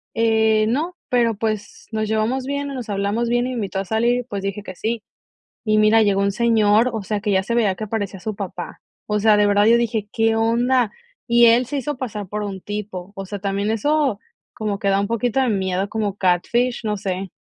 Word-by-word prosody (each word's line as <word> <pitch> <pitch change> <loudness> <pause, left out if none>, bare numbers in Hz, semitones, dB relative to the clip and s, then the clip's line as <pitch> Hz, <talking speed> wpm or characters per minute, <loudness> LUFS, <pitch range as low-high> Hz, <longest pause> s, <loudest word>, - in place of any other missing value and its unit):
"Eh, 220 -1 +3
no, 315 +9 -1
pero, 235 -2 +2
pues, 215 -1 -4
nos 215 -1 -1
llevamos 220 +5 0
bien, 280 +1 -3
o - - -5
nos 250 -3 -6
hablamos 205 +4 -1
bien, 240 +1 +1
y - - -3
me - - -4
invitó 200 -4 -3
a 195 - -3
salir, 235 +4 +1
y, - - -11
pues, 205 -5 -5
dije 195 +1 -3
que 185 - -8
sí". 225 +3 -3 0.6
Y 215 -1 +2
mira, 215 +1 +5
llegó 200 -2 +2
un 200 0 +1
señor, 225 +1 +3
o 220 -2 -3
sea, 210 +1 -2
que 210 0 -1
ya 190 -1 +3
se 235 - -2
veía 210 -5 +2
que 215 - -5
parecía 205 -3 -3
su 215 +4 -4
papá. 185 -3 -6 0.3
O 210 0 0
sea, 215 0 +5
de 210 - +4
verdad, 205 0 +4
yo 230 +1 +6
dije: 225 -3 -1
"¿Qué 225 0 +2
onda?". 235 +1 +2 0.4
Y 235 0 +6
él 235 +2 +5
se 285 +3 -3
hizo 290 +2 -3
pasar 210 -6 -5
por 210 +2 -3
un 195 -2 -5
tipo. 205 -3 -6
O 195 - -5
sea, 205 +1 -5
también 200 +1 -1
eso, 275 +1 +1 0.4
como 210 -2 -3
que 200 - -1
da 195 0 +3
un 200 - 0
poquito 230 +2 0
de 260 - +2
miedo. 190 -1 -1
Como 210 -2 -2
catfish, 210 +7 +1
no 210 -1 -1
sé. 190 0 -4
215 Hz, 230 wpm, -21 LUFS, 200-235 Hz, 0.6 s, yo